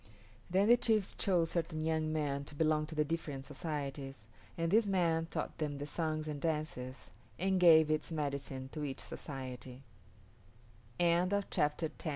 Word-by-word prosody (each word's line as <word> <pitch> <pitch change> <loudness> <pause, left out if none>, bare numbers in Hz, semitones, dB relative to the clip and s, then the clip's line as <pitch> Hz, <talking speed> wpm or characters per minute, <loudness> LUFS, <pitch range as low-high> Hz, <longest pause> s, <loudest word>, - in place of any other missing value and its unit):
Then 190 +3 +3
the 240 +1 +7
chiefs 220 -5 +2
chose 175 -5 +2
certain 160 -2 -1
young 160 -1 0
men 145 -3 -1
to 145 - -10
belong 155 0 +2
to 160 - -8
the 150 0 +2
different 150 -4 -3
societies, 140 -5 -5 0.3
and 165 0 0
this 220 +1 +4
man 165 -4 +2
taught - - -4
them 150 -2 -2
the 145 - -4
songs 155 0 -2
and 145 -2 -4
dances, 145 - -3 0.3
and 190 +1 +1
gave 160 -3 +7
its 155 +2 0
medicine 140 -3 -3
to 150 - -4
each 135 -2 -3
soc - - -8
155 Hz, 145 wpm, -34 LUFS, 145-165 Hz, 0.3 s, the